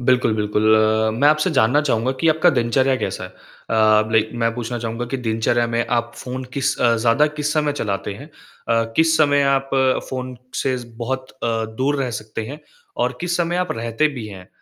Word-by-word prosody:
बिल्कुल, 125 -2 +2
बिल्कुल। 105 0 -1 0.6
मैं 145 - +6
आपसे 155 +4 +2
जानना 130 -1 +3
चाहूँगा 130 -3 0
कि 165 - +3
आपका 160 +3 +4
दिनचर्या 130 +1 +2
कैसा - - -4
है? - - -9
अ, 110 -1 0
लाइक 110 -1 +2
मैं 115 - +2
पूछना 120 0 -4
चाहूँगा 115 +1 -4
कि 135 - -1
दिनचर्या 115 +2 +1
में 115 0 -1
आप 120 0 -1
फ़ोन 130 +1 -6
किस 140 0 0
अ, 120 -1 +4
ज़्यादा 115 +6 +3
किस 150 0 -1
समय 150 -1 +1
चलाते 100 -6 -3
हैं? 125 +8 -10 0.4
अ, 115 0 +2
किस 160 0 +4
समय 145 -2 +4
आप 135 0 -2 0.4
फ़ोन 130 -1 -5 0.3
से 130 -1 0
ज़ 120 - -10
बहुत 130 +2 -4
अ, 130 - -6 0.3
दूर 140 +2 +1
रह 125 - -2
सकते 110 0 -6
हैं 145 +5 -8 0.4
और 125 0 -2
किस 175 -1 -1
समय 175 0 0
आप 180 0 -1
रहते 115 +6 0
भी 110 - -6
हैं 95 -3 -10
अ, - - -27
125 Hz, 200 wpm, -20 LUFS, 115-145 Hz, 0.6 s, मैं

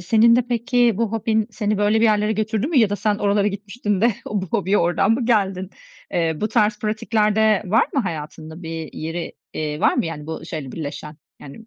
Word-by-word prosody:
senin 225 +6 +5
de 245 -1 +1
peki 240 0 +2
bu 225 -1 -1
hobin 220 -1 0
seni 210 -2 -1
böyle 210 +2 +2
bir - - +4
yerlere 210 -1 +3
götürdü 220 +2 -1
mü 300 -4 +2
ya 215 -4 +4
da 205 - -1
sen 205 +1 0
oralara 205 0 +2
gitmiştin 205 0 -2
de 230 0 +3
o 205 -2 -2
bu 190 - -4
hobiye 205 0 +1
oradan 175 +4 +2
mı 235 0 0
geldin? 195 -5 +1 0.4
Eee, 165 -2 +1
bu 215 - 0
tarz 215 -2 +2
pratikler 215 -1 0
de 220 -2 +3
var 215 +5 +3
mı 275 - +2
hayatında 160 - -6
bir 160 -1 -6
yeri, 165 +2 -5 0.2
eee, 150 0 -3
var - - +3
mı - - 0
yani 150 -2 -6
bu 160 0 -6
şeyle 155 -6 -6
birleşen? 150 0 -6 0.2
Yani 145 +11 -12
205 Hz, 210 wpm, -21 LUFS, 170-220 Hz, 0.4 s, senin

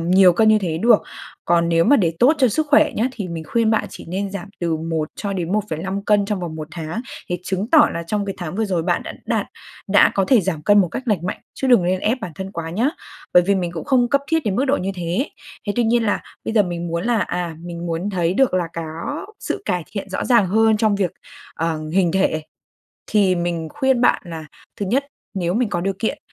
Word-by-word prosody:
nhiều 180 +2 +5
cân 220 +5 +3
như 215 - +6
thế 170 -5 -2
được. 230 +3 +5 0.4
Còn 170 0 +2
nếu 165 0 +3
mà 285 - +5
để 170 -8 +1
tốt 255 +5 +6
cho 255 -3 +4
sức 310 +7 0
khỏe 295 - +5
nhé, 235 +4 +1
thì 205 -7 -5
mình 165 -2 -5
khuyên 230 +5 +1
bạn 220 - +2
chỉ - - -10
nên 195 +3 -3
giảm 200 -1 -6
từ 170 -2 0
1 160 -1 -2
cho 200 -1 -3
đến 180 -2 -3
1,5 195 -1 -2
cân 205 -1 +3
trong 205 -2 -2
vòng 165 -3 -5
một 155 0 -6
tháng 160 +5 -5 0.3
thì 180 - -2
chứng 195 +5 -2
tỏ 315 -2 +7
là 170 - -3
trong 205 +2 -1
cái 195 - -4
tháng 175 -2 -5
vừa 225 - +1
rồi 185 -5 -1
bạn 175 +1 0 0.2
đạt - - 0 0.4
đã 205 +1 +6
có 195 - +2
thể 250 -4 +6
giảm 165 -5 -3
cân 205 +5 +5
một 180 - +1
cách 215 - -5
lành 185 -5 0
mạnh 185 - -4
chứ 265 - -2
đừng 240 -8 +5
nên 185 +1 0
ép 230 +6 +1
bản 185 -6 -6
thân 190 +4 -6
quá 165 -2 -5
nhá. 225 +10 +1 0.5
Bởi 180 - +8
vì 200 - +3
mình 175 -3 -2
cũng 165 - -5
không 250 -3 +3
cấp 280 +3 +3
thiết 325 0 +2
đến 195 -2 0
mức 265 - +2
độ 280 0 +2
như 190 - -2
thế. 180 - -2 0.4
Thế 205 - 0
tuy 240 - +2
nhiên 230 +1 +2
là 205 - 0 0.2
bây 225 - -3
giờ 210 - +6
mình 175 -1 -4
muốn 170 +2 -2
là, 235 -2 +2
à, 175 -4 -3
mình 175 0 -6
muốn 170 +4 -2
thấy 175 -2 0
được 265 -2 +3
là 175 -2 0
có 165 - -5
sự - - -3
cải 180 -1 0
thiện 200 -2 -5
rõ - - -2
ràng 235 -6 +4
hơn 220 +2 +4
trong 215 -1 +2
việc, 190 -4 0 0.4
ờ, 160 -1 -2
hình 180 -3 +2
thể 190 -5 +1 0.7
thì 200 -4 +3
mình 170 -2 -2
khuyên 265 -4 +1
bạn - - +3
là 165 -2 -7 0.3
thứ 200 - -2
nhất, 270 +7 +1 0.3
nếu 175 -3 -1
mình 230 +1 +1
có 175 - -2
điều 195 +2 0
kiện 235 +6 -1
190 Hz, 250 wpm, -21 LUFS, 170-220 Hz, 0.7 s, Bởi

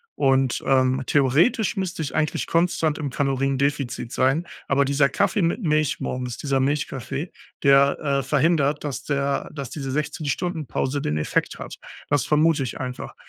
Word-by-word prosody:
und 135 -2 +2
ähm, 130 0 +3
theoretisch 150 - +2
müsste 185 -3 -3
ich 150 - -4
eigentlich 155 -1 0
konstant 165 -2 +1
im 145 -3 -3
Kaloriendefizit 135 -2 -1
sein, 135 +7 +1 0.2
aber 140 0 +3
dieser 140 0 +2
Kaffee 210 - +1
mit 170 +6 0
Milch 155 -3 +1
morgens- 125 -1 -4
dieser 135 -2 0
Milchkaffee- 140 +2 -2 0.3
der 140 0 +5
äh, 140 -2 0
verhindert, 150 -1 +1
dass 135 -4 -4
der 140 0 -1
dass 140 -4 -6
diese 135 -3 -4
16 150 +2 -3
Stunden 160 +1 -2
Pause 140 +4 -1
den 75 - -1
Effekt 75 - -1
hat. - - -8 0.3
Das 145 -1 +2
vermute 155 -1 +3
ich 125 - -5
einfach. 125 -1 -6
140 Hz, 160 wpm, -23 LUFS, 135-155 Hz, 0.3 s, der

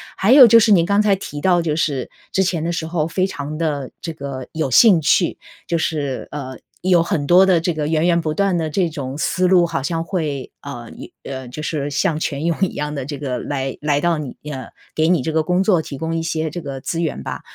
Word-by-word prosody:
还 205 +5 +2
有 270 -2 +10
就 230 +1 +7
是 220 -1 +3
您 175 -5 +5
刚 200 +3 +3
才 205 -2 +3
提 150 -6 -7
到 180 0 +3
就 160 -2 -1
是， 145 -5 -1 0.2
之 190 - +2
前 175 -4 -1
的 170 - -1
时 165 -1 -3
候 160 -1 -1
非 185 +3 0
常 150 -5 -5
地 150 -5 -2
这 165 - -5
个 140 -3 -7
有 160 -4 -2
兴 185 - +6
趣。 165 +4 +2 0.3
就 170 - -1
是， 145 -5 -2
呃， 130 -3 -6 0.3
有 180 -2 +4
很 160 -3 -1
多 180 +5 +6
的 180 -3 +4
这 170 +1 -1
个 150 -1 -2
源 160 +1 +1
源 170 -1 +3
不 155 -1 -2
断 195 +1 +1
的 160 -2 -1
这 175 +2 0
种 140 -3 -6
思 180 +5 +1
路， 180 -1 +5
好 150 -5 -2
像 165 +3 -2
会， 155 -7 -3
呃， 120 -5 -8
涌 - - -10
呃， 130 -2 -6
就 140 +5 -7
是 145 -2 -2
像 150 +2 0
泉 145 -1 -3
涌 170 -1 +1
一 190 - +1
样 150 0 -3
地 135 -3 -4
这 145 -1 -5
个 135 -3 -3
来 135 -2 -3
来 145 -1 +1
到 170 0 +1
你 140 -4 -6 0.2
呃， 130 -2 -6 0.3
给 160 0 +1
你 170 -6 +2
这 160 - -2
个 160 - +2
工 180 +4 +1
作 185 -5 +3
提 140 - -8
供 165 +3 -3
一 165 - -1
些 160 -1 -2
这 175 - -5
个 140 -3 -6
资 165 +5 -3
源 160 -4 -3
吧。 - - -5
160 Hz, 265 characters per minute, -20 LUFS, 145-175 Hz, 0.3 s, 有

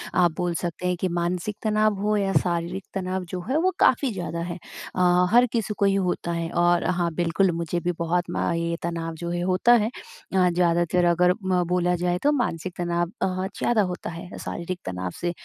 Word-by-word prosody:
आप 175 -2 +4
बोल 175 -1 0
सकते 175 +1 -3
हैं 180 - +1
कि 185 - +2
मानसिक 175 +3 -2
तनाव 215 0 +2
हो 210 +1 +1
या 195 -1 0
शारीरिक 175 +2 -2
तनाव 185 -1 -2
जो 180 0 -4
है 275 - +2
वो 370 +4 +2
काफ़ी 260 0 +4
ज़्यादा 170 -3 -4
है। 175 - -4 0.4
अ, 180 0 +4
हर 245 +1 +6
किसी 215 -2 0
को 200 - +2
ही 195 0 +3
होता 170 -1 -2
है, 165 0 -2
और 175 0 +3
हाँ, 175 -2 0
बिल्कुल, 175 +2 +2
मुझे 170 +1 -1
भी 175 +1 -1
बहुत 170 +1 +1
म - - 0
ये 170 0 -1
तनाव 165 -1 -3
जो 170 +2 -5
है 175 0 -2
होता 240 +6 +4
है। 215 - +1
अ, 185 -6 -2
ज़्यादातर 175 0 +2
अगर 180 +1 +4
म 185 -1 +2
बोला 180 0 +1
जाए 175 0 0
तो 290 - +4
मानसिक 185 - -1
तनाव 175 -1 0
अ, 185 0 0
ज़्यादा 230 -3 +2
होता - - -6
है 170 +2 -8
शारीरिक 175 +1 -5
तनाव 90 -1 -3
से 175 0 0
180 Hz, 205 wpm, -25 LUFS, 170-190 Hz, 0.4 s, हर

